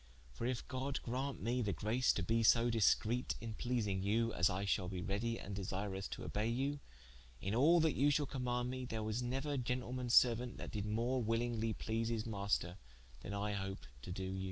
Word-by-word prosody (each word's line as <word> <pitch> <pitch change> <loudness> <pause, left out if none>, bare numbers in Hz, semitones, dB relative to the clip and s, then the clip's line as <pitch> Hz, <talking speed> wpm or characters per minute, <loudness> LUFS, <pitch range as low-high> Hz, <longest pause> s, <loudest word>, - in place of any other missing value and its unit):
For 115 - -3
if 125 -2 -2
God 130 +1 -2
graunt 130 +3 -3
me 120 +3 +1
the 105 -4 0
grace 120 +5 +2
to 100 - -1
be 115 +4 +2
so 115 +1 +5
discrete 115 +2 +2
in 115 -1 -5
pleasing 110 -5 -1
you, 115 +3 +1
as 90 - +3
I 95 +2 -1
shalbe 90 -2 -1
readie 115 +4 -1
and 100 +1 -6
desirous 95 0 -3
to - - -6
obey 105 +2 -1
you, 135 +5 0 0.6
in 95 +8 -2
all 155 +9 +6
that 160 -1 +3
you 145 +2 +3
shall 145 0 +2
commaunde 125 -2 -1
mee, 130 0 -4
there 110 -2 -3
was 110 +3 -1
neuer 135 +4 -1
gentleman's 125 0 -1
seruaunt, 120 0 +4
that - - -6
did 105 -1 -3
more 120 +4 0
willingly 115 0 0
please 115 +1 -2
his 115 -2 -1
maister, 100 -4 -1 0.4
then 100 - -5
I 105 +1 -1
hope 95 -1 -4 0.2
to 90 - -7
doe 95 +1 -4
you." 95 0 -3
115 Hz, 200 wpm, -37 LUFS, 100-125 Hz, 0.6 s, all